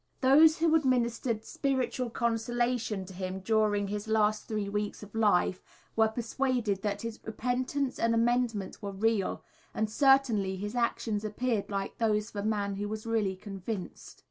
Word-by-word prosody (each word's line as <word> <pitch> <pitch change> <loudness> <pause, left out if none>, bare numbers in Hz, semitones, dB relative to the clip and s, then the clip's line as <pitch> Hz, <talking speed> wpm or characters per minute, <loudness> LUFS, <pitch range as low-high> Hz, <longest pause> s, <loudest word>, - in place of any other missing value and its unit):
Those 305 +5 +6
who 325 0 +2
administered 240 -6 +1
spiritual 260 -2 -1
consolation 235 -2 -1
to 190 - -11
him 185 +1 -4
during 210 -1 +2
his 205 +2 -4
last 215 -1 +1
three 210 -2 -2
weeks 210 +1 -3
of 205 - -12
life 205 -4 +2 0.3
were 220 0 +5
persuaded 230 -2 -1
that 205 0 -2
his 230 -1 -5
repentance 255 +4 -2
and 230 0 +2
amendment 230 -3 0
were 200 - -4
real, 205 0 0 0.3
and 220 - +1
certainly 245 -8 +3
his 205 +3 -5
actions 230 -3 -1
appeared 215 0 -1
like 195 -1 -4
those 215 -2 +1
of - - -10
a 200 - -2
man 200 -2 -1
who 205 +1 -3
was 215 +1 -5
really 220 -4 0
convinced. 195 0 -7
220 Hz, 155 wpm, -30 LUFS, 205-240 Hz, 0.3 s, Those